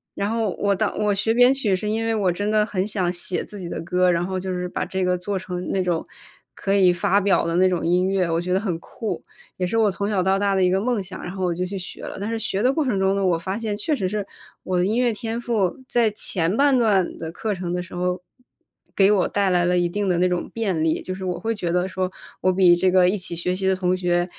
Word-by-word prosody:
然 200 +2 -1
后 225 -3 0
我 200 -1 +2
到 - - -1
我 210 -1 +1
学 200 +3 +1
编 245 +3 +5
曲 225 -8 +1
是 210 +3 -4
因 220 +1 -1
为 225 0 0
我 195 -4 +2
真 205 +4 -2
的 215 -1 +3
很 195 -2 -2
想 185 -4 -1
写 175 0 -2
自 205 - -10
己 175 -2 -6
的 - - -4
歌， 180 +1 +2
然 170 0 0
后 185 0 -3
就 185 0 -4
是 180 0 -2
把 - - -3
这 190 -1 -2
个 180 - +2
做 190 +2 -3
成 180 -2 -5
那 190 - +1
种 175 -2 -1 0.5
可 195 - -1
以 190 -3 +5
发 180 +3 +2
表 200 -3 +2
的 170 0 0
那 185 +1 +5
种 180 -2 -1
音 180 +2 +2
乐， 190 -2 +1
我 165 - +1
觉 180 +1 -4
得 185 - +3
很 185 -6 -2
酷， 220 +5 -5 0.3
也 180 - -1
是 225 - -1
我 215 -2 +3
从 200 +2 -2
小 195 -4 +1
到 190 +1 +2
大 200 -1 +1
的 190 - +2
一 180 - +3
个 190 +1 +1
梦 235 -3 0
想， 185 0 -8
然 180 - -5
后 190 -1 -3
我 175 - 0
就 180 +2 -2
去 195 +2 -5
学 180 - -8
了。 - - -6
但 205 +3 -3
是 230 - -2
学 205 -1 -1
的 255 +2 +3
过 310 - +1
程 235 -8 0
中 190 0 +2
呢， 200 - 0
我 170 -2 +2
发 190 +5 -4
现 215 -3 -3
确 295 +9 0
实 190 -8 -2
是 205 0 -2 0.4
我 185 -1 0
的 - - +2
音 220 - 0
乐 245 -2 +2
天 225 +2 -4
赋， 220 -7 0
在 235 -2 +2
前 190 -2 0
半 280 -2 +4
段 205 -6 +1
的 160 0 -5
课 215 +4 -3
程 180 -2 -4
的 180 0 -2
时 180 - -13
候， 180 0 -2 0.7
给 195 +1 +5
我 195 -3 +3
带 200 -2 +1
来 175 -1 +2
了 180 +1 +2
一 175 -1 +1
定 205 +3 -2
的 180 -2 +2
那 180 +1 +3
种 180 -1 -2
便 195 -8 -1
利， 160 0 +1
就 185 - -5
是 190 0 -6
我 180 -1 -2
会 225 +1 -1
觉 190 -6 -3
得 180 +1 +1
说 185 -1 -2 0.3
我 185 - +2
比 180 -2 +5
这 185 +1 +2
个 180 -1 +5
一 205 - 0
起 180 -2 -2
学 175 +2 -1
习 190 +1 -1
的 190 - +3
同 185 -1 +1
学， 175 -1 +1
190 Hz, 310 characters per minute, -23 LUFS, 180-210 Hz, 0.7 s, 编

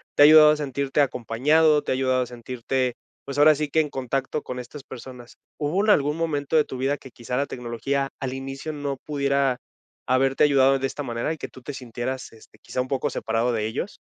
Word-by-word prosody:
te 145 - +7
ha - - +10
ayudado 155 0 +9
a 150 - +1
sentirte 140 0 -2
acompañado, 145 +5 +2
te - - -3
ha - - +3
ayudado 130 -1 +1
a - - -5
sentirte, 125 +1 -3 0.3
pues, 140 0 -6
ahora 150 +1 +7
sí 150 0 -2
que 160 - +2
en 155 - +2
contacto 135 +2 -2
con 125 0 -6
estas 130 +3 -9
personas. 125 -2 -11 0.2
¿Hubo 160 +7 0
en - - +1
algún 150 -4 +3
momento 160 -2 0
de 150 - +4
tu 130 - -7
vida 135 +3 0
que 130 - -13
quizá 125 +2 -5
la 140 - +1
tecnología 130 +3 -3
al 130 -1 -3
inicio 135 +3 -5
no 145 -2 -3
pudiera 140 -3 +1 0.5
haberte 135 +2 +3
ayudado 135 -2 +4
de 135 - 0
esta 145 - -6
manera 120 +3 -2
y 160 - -8
que - - -6
tú 130 - -15
te 145 - -7
sintieras, 130 0 -5
este, 110 - -18
quizá 125 - -3
un 130 - -5
poco 135 -2 0
separado 115 +2 -1
de 110 -2 -1
ellos? 135 - -4
135 Hz, 220 wpm, -24 LUFS, 125-145 Hz, 0.5 s, ha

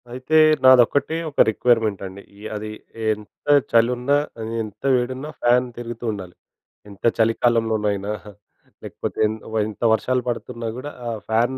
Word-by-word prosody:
అయితే 130 +5 0 0.3
నాదొక్కటే 130 +4 +5 0.2
ఒక - - -9
రిక్వైర్మెంట్ 110 -2 +1
అండి. 95 +1 -9 0.2
య్ - - -8
అది 105 +1 -5 0.4
ఎంత 105 -1 -8 0.2
చలున్నా, 125 +4 +3 0.3
అది 110 +1 -5
ఎంత 105 -1 -11
వేడున్నా, 130 +4 -2
ఫ్యాన్ 125 +1 +4
తిరుగుతూ 120 0 -6
ఉండాలి. 95 -4 -8 0.5
ఎంత 100 -1 -15
చలికాలంలోనైనా, 110 -3 +1 0.7
లేకపోతే - - -6
ఎంత 110 0 -5 0.3
ఎంత 110 +2 -8
వర్షాలు 125 +3 0
పడుతున్నా 115 -1 -5
కూడా 145 +3 -6 0.2
ఆ - - -1 0.2
ఫ్యాన్ 120 +4 +1
115 Hz, 130 wpm, -22 LUFS, 110-125 Hz, 0.7 s, నాదొక్కటే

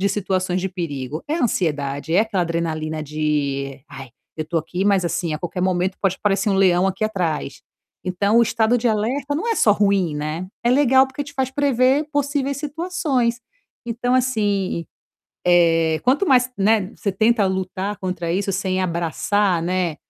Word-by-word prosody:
de 200 - +2
situações 185 -2 -1
de 190 - -1
perigo? 155 -5 -5
É 310 - 0
a 335 - -1
ansiedade, 150 - -1
é - - +5
aquela 210 -5 0
adrenalina 160 -2 -2
de: 140 -3 -2
"Ai, 135 -1 -9 0.3
eu 155 - -3
estou 165 +2 -1
aqui, 175 +4 -4
mas 195 -3 +3
assim 170 -2 -1
a - - -4
qualquer 175 +2 -4
momento 185 0 0
pode 190 -2 +1
parecer 205 +1 +1
um 195 - +2
leão 185 -1 +4
aqui 195 +3 -1
atrás". 170 -9 -2 0.4
Então 200 +5 +2
o 235 - +6
estado 230 +1 +2
de 240 - +1
alerta 250 +7 -1
não 400 +10 -2
é 455 - +2
só 210 - +4
ruim, 200 -5 +1
né, 155 +4 -4 0.2
é 240 - +3
legal 265 0 +5
porque 265 +2 -5
te 285 0 -12
faz 260 -1 -1
prever 275 +1 +2
possíveis 280 -1 -1
situações. 290 -6 -1 0.5
Então 245 +2 -1
assim, 205 -9 0 0.6
eh, 165 -2 +4
quanto 275 +10 +2
mais, 255 -2 +4
né, 205 0 +2
você 200 - -2
tenta 220 +2 +2
lutar 190 +2 -3
contra 180 -3 -3
isso, 195 +2 -1
sem 185 0 -1
abraçar, 175 +2 0
né, 180 -2 -1
195 Hz, 175 wpm, -21 LUFS, 170-240 Hz, 0.6 s, o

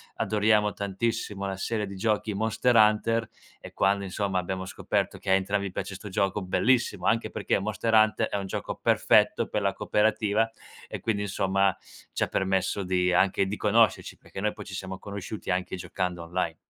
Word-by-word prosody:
adoriamo 105 -1 +2
tantissimo 100 0 -3
una 95 -1 -3
serie 105 +2 -2
di 100 0 -8
giochi, 105 +1 0
Monster 110 +4 +1
Hunter, 110 +1 +3 0.3
e - - -11
quando 100 +1 +2
insomma 95 0 -1
abbiamo 95 +1 -4
scoperto 95 - -2
che - - -6
a - - +5
entrambi 100 +1 +1
piace 100 - -5
'sto 105 +3 -8
gioco 100 +1 0
bellissimo 120 +7 +1
anche 115 +1 +2
perché 105 -2 -1
Monster 110 +3 -2
Hunter 110 0 +4
è - - -1
un 100 - -4
gioco - - -5
perfetto - - +3
per 105 - -2
la 100 -1 +1
cooperativa 110 +2 +1 0.4
e - - -6
quindi 105 -3 -1
insomma, 95 -1 +1 0.4
ci - - 0
ha - - 0
permesso 95 +1 0
di 90 0 +1
anche 95 +2 +3
di 105 +2 -3
conoscerci, 110 +1 +2
perché - - -10
noi 105 +1 0
poi 105 - -9
ci 95 - -9
siamo 95 0 -5
conosciuti 100 0 -7
anche 90 0 -1
giocando 90 -1 -3
online. 85 -1 -2
100 Hz, 180 wpm, -27 LUFS, 95-110 Hz, 0.4 s, a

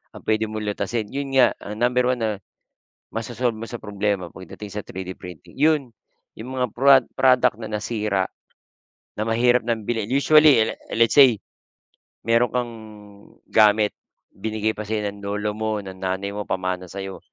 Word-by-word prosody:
ang - - -10
puwede 110 0 +1
mong 110 0 -4
lutasin, 110 +3 -2
yun 140 0 -3
nga 125 -3 +5
ah, 105 - -7
number 125 +1 +2
1 125 - +1
na, 110 - +1 0.8
maso-solve 115 +1 -2
mo 115 - -6
sa 120 - -5
problema 100 -2 -2
pagdating 95 +3 -10
sa 105 -1 -5
3D 95 0 -6
printing 90 -5 -12
yun. 150 -3 +2 0.5
Yung 125 +4 -7
mga 125 - +2
prod 135 +1 +6
product 125 -3 +4
na 110 - -5
nasira, 105 -2 -1 0.9
na - - 0
mahirap 120 +2 +3
ng 115 -2 -1
bilhin, 115 -3 -1
usually 145 -1 +6
le - - -3 0.2
let's 115 0 +4
say, 130 -7 +7 0.9
meron 115 0 +3
kang, 120 -1 -1 0.8
gamit 105 -1 +5 0.4
binigay 110 +1 -1
pa 105 - -5
sa'yo 105 -1 -1
ng 100 - -14
lolo 105 +1 -2
mo, 110 -1 -2
ng 95 -1 -8
nanay 95 +1 -2
mo, 105 - -3
o - - -43
pamana 95 -1 -2
sa'yo. 95 0 -7
110 Hz, 165 wpm, -23 LUFS, 100-125 Hz, 0.9 s, say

